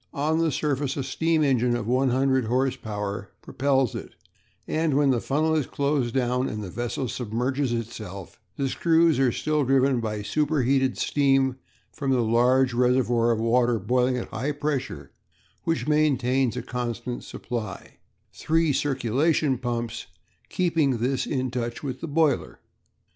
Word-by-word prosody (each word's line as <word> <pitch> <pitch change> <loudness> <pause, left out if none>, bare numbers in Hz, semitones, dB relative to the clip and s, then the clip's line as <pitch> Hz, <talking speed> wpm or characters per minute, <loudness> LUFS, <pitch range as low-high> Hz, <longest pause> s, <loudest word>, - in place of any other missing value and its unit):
On 155 +3 +1
the 165 -1 +2
surface 145 -2 -1
a 135 - -1
steam 160 +3 +1
engine 125 -3 +2
of 120 -3 -3
100 130 +1 +2
horse 130 +3 +1
power 105 -4 -5
propels 135 -3 +1
it, - - -8 0.5
and 160 -3 0
when 140 -1 +4
the 120 -3 0
funnel 155 +3 +1
is 155 -4 0
closed 140 -4 -1
down 125 0 +1
and 105 0 -5
the 95 - -7
vessel 120 +4 -3
submerges 125 +4 -2
itself, 110 -5 -6 0.2
the 140 - 0
screws 165 +1 +3
are 130 -2 +3
still 150 +4 0
driven 135 -1 +3
by 105 -2 -3
superheated 135 0 +1
steam 135 -2 +2 0.4
from 140 -3 -3
the 130 -3 +3
large 125 +3 +3
reservoir 120 -1 +2
of 115 -2 +1
water 120 +1 +2
boiling 125 +5 +1
at 120 - -5
high 135 +6 -2
pressure 145 -2 -3 0.5
which 150 -6 -1
maintains 135 -5 +2
a 125 - -3
constant 125 -1 -4
supply, 110 -5 -6 0.4
three 160 -1 +1
circulation 135 +2 +1
pumps 120 -2 -3 0.4
keeping 165 -8 +1
this 125 +3 -1
in 130 -3 -1
touch 120 0 -4
with 130 -3 -5
the 165 - -4
boiler. 145 - 0
130 Hz, 150 wpm, -25 LUFS, 120-145 Hz, 0.5 s, when